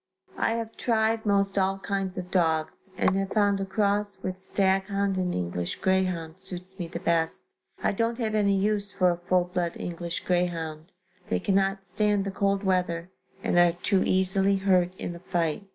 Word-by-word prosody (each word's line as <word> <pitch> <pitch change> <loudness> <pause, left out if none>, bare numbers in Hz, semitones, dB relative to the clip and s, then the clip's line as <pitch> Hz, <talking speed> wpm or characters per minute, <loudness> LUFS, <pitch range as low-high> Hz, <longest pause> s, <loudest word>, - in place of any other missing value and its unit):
I - - +2
have 230 -1 -4
tried 225 -1 +1
most 200 -1 +2
all 190 0 +1
kinds 195 -1 -3
of 180 0 -5
dogs 160 0 0
and 185 - +2
have 195 0 -2
found 205 -2 +3
a - - -1
cross 205 0 0
with 185 0 -3
stag 190 0 +1
hound 200 0 0
and 185 -1 0
English 85 0 -2
greyhound 185 -3 0
suits 190 0 -9
me 175 - -3
the 170 0 -6
best. 165 -2 0 0.4
I - - +3
don't 230 +3 0
have 225 -3 -1
any 200 -2 +3
use 205 +1 0
for 185 -3 +3
a 175 - -2
full 180 +1 +2
blood 175 -1 -2
English 170 0 -4
greyhound 170 -2 -1 0.4
they 90 - +1
cannot 195 - +1
stand 205 +2 +1
the 195 - -2
cold 200 +1 0
weather 180 -2 0 0.3
and 175 - +3
are 175 -1 +5
too 185 +2 +1
easily 190 +1 +2
hurt 185 -2 +3
in 175 - -5
a - - -9
fight. 175 +1 -2
190 Hz, 185 wpm, -27 LUFS, 175-200 Hz, 0.4 s, are